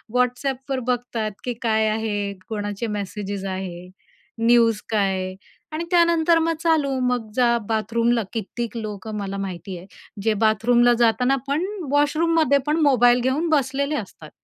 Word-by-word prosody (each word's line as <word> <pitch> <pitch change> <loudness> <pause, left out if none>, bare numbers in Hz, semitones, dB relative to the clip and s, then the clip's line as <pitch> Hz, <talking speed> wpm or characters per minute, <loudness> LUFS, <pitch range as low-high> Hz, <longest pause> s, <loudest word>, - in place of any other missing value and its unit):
WhatsAppवर 260 +2 0
बघतात 240 -3 -1
की 245 - -2
काय 220 -2 +2
आहे, 210 -2 -2 0.2
कोणाचे 205 +1 -3
मेसेजेस 200 -1 -4
आहे, 185 -2 -5 0.6
न्यूज 230 -2 +4
काय 190 -3 0 0.4
आणि 315 +2 -2
त्यानंतर 340 -1 +4
मग 330 0 +1
चालू. 290 -5 +2
मग 245 -3 -2
जा, 240 -2 +3
बाथरूमला. 230 +1 +1
कित्येक 235 +2 -4
लोक 215 -2 -6
मला 200 0 -4
माहिती 185 -1 -5
आहे, 175 +2 -12 0.4
जे 220 0 +2
बाथरूमला 240 +3 +4
जाताना 250 +3 +3
पण 295 +6 0 0.3
वॉशरूममध्ये 305 0 +3
पण 305 - +2
मोबाईल 245 -4 +5
घेऊन 280 +7 0
बसलेले 280 0 +1
असतात. 185 - -7
235 Hz, 135 wpm, -23 LUFS, 205-275 Hz, 0.6 s, मोबाईल